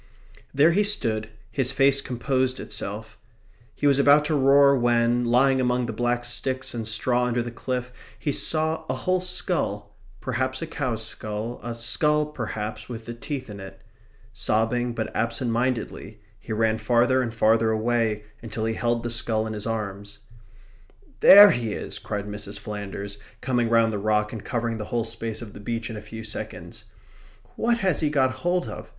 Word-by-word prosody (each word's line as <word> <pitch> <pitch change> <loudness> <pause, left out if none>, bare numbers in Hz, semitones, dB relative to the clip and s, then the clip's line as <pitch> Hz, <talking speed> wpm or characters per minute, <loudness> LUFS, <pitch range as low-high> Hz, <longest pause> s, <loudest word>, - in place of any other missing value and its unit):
There 150 +4 +5
he 200 +5 +3
stood. 110 - -1 0.2
His 130 +2 0
face 135 0 +3
composed 130 0 -1
itself. 105 +2 -5 0.6
He - - -3
was 140 -1 +4
about 145 +1 +6
to 155 0 0
roar 140 0 +6
when, 120 -1 +2
lying 130 +2 +3
among 125 0 +1
the 115 - -4
black 120 +2 -1
sticks 130 +2 -2
and 115 -2 -4
straw 120 +3 +1
under 120 -1 0
the 120 - -6
cliff, 125 +1 -4 0.2
he 145 - -2
saw 160 +2 0
a 130 - 0
whole 185 +8 0
skull 105 - -1 0.2
perhaps 130 +1 -2
a - - -3
cow's 125 -8 -3
skull, 110 +2 -5
a 120 -1 -5
skull, 150 +7 +2
perhaps, 110 -7 -5
with 115 -2 -7
the 120 - -6
teeth 130 +2 -5
in 105 -2 -9
it. 95 0 -10 0.5
Sobbing, 115 +2 0
but 110 -2 -4
absent 115 +2 -1
mindedly, 115 -3 -2 0.2
he - - -10
ran 110 0 +1
farther 125 +2 +3
and 120 -2 -2
farther 110 0 +3
away 110 -1 0 0.2
until 110 -1 -4
he 115 - 0
held 120 +1 -1
the 120 - -3
skull 110 -2 0
in 110 - -4
his 105 0 -5
arms. 100 -2 -4 1.0
"There 205 +1 +10
he 115 -3 -2
is!" - - -6
cried 105 -1 -4
Mrs. 105 -1 -5
Flanders, 100 -1 -6 0.2
coming 120 -2 0
round 115 -1 +3
the 105 - -2
rock 105 +1 +1
and 110 - -6
covering 115 -2 -2
the 105 - -4
whole 115 +1 -1
space 115 0 -5
of 105 - -11
the - - -10
beach 115 +2 -4
in - - -6
a 105 - -6
few 110 +1 -9
seconds. 110 - -7 0.7
"What 235 +1 +1
has 185 -6 +2
he 155 - +1
got 135 -3 +2
hold 175 0 0
of? - - -8
120 Hz, 180 wpm, -25 LUFS, 110-130 Hz, 1.0 s, There